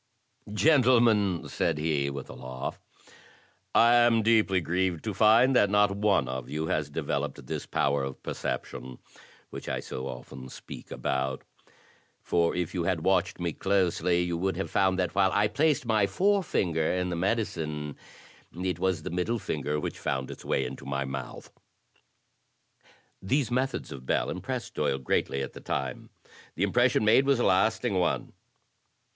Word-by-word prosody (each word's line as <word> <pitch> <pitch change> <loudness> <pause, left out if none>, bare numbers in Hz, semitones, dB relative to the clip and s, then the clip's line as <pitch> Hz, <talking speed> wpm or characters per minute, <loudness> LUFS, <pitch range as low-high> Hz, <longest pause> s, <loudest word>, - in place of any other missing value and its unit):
"Gentlemen," 115 - +3
said - - -1
he, 75 -3 0
with 70 -1 -6
a - - -9
laugh, 65 +1 -6 1.0
"I 115 +1 +6
am 120 -2 +4
deeply 110 -4 +3
grieved 90 0 -1
to 110 - -3
find 115 +6 +5
that 100 - +5
not 105 0 +4
one 100 -9 +2
of 65 -1 -5
you 75 +2 -2
has 75 -2 -1
developed 75 -3 -3
this - - -5
power 70 0 +1
of 70 -1 -6
per - - -4
ception, 65 -1 -5 0.5
which - - -7
I - - -1
so 65 +1 -6
often 65 +1 -9
speak - - -10
about; 65 0 -2 0.8
for 85 -1 +1
if 90 -1 -2
you 90 -3 -1
had 85 -2 0
watched 95 0 +1
me 85 -2 -2
closely, 90 -2 +1
you 85 -1 -2
would 95 -1 -1
have 95 - -3
found 95 -1 +2
that 90 -1 -1
while 95 0 +3
I 105 +1 +3
placed 150 -2 +1
my 110 -3 +2
forefinger 100 - +1
in 90 0 -1
the - - -1
medicine, 80 -7 -2 0.6
it 90 -1 -2
was 95 -4 0
the - - -5
middle 90 +7 -1
finger 75 -6 -2
which - - -5
found 65 -1 -2
its - - -10
way - - 0
into - - -7
my 70 0 -2
mouth." 65 -1 -7 1.7
These 130 +6 0
methods 130 +2 -1
of 65 -1 -9
Bell - - +1
impressed - - -5
Doyle 65 - 0
greatly 70 +1 -1
at 65 - -6
the - - -10
time. 65 -2 -4 0.5
The 90 - -1
impression 120 +2 +3
made 120 +6 +5
was 140 -3 +3
a - - +2
lasting 100 +4 +2
one. 90 - -1
90 Hz, 165 wpm, -28 LUFS, 75-110 Hz, 1.7 s, I